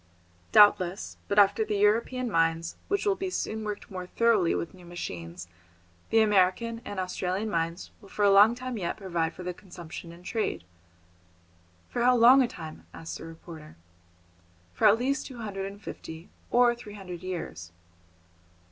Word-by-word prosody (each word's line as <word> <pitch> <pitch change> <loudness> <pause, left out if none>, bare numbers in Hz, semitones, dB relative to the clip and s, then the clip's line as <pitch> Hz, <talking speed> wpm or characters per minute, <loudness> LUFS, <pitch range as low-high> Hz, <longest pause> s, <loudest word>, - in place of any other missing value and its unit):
"Doubtless, 200 -3 +4
but 200 - -2
after 205 +1 +5
the 210 - -2
European 230 +4 +1
mines, 165 -1 +1
which 400 +1 0
will 405 - +3
be 385 -1 -4
soon 220 -11 -3
worked 210 -1 -6
more 180 -1 -6
thoroughly 220 -5 +2
with 170 - -4
new 185 -1 -15
machines, 90 - -7 0.6
the 225 - +4
American 215 +3 +2
and 205 - -5
Australian 185 +3 -2
mines 165 +1 -2
will 200 - -15
for 205 - 0
a 200 - +6
long 205 +4 +7
time 250 -2 -5
yet 170 -2 -3
provide 170 -5 -2
for 180 - -8
the 180 0 -3
consumption 175 -2 -10
in 170 +1 -14
trade." 180 - -2 1.2
"For 240 - -3
how 250 +1 +5
long 245 +3 +7
a 250 - +3
time?" 160 -7 -10
asked 165 - -7
the - - -9
reporter. 165 -1 -11 1.0
"For 220 - +4
at 210 +2 +6
least 270 +4 -1
two 255 - -10
hundred 195 -4 -4
and 200 +1 -10
fifty 160 -4 -9 0.2
or 245 0 +4
three 225 -3 -11
hundred 180 -4 -8
years." 170 - -6
195 Hz, 165 wpm, -28 LUFS, 170-225 Hz, 1.2 s, long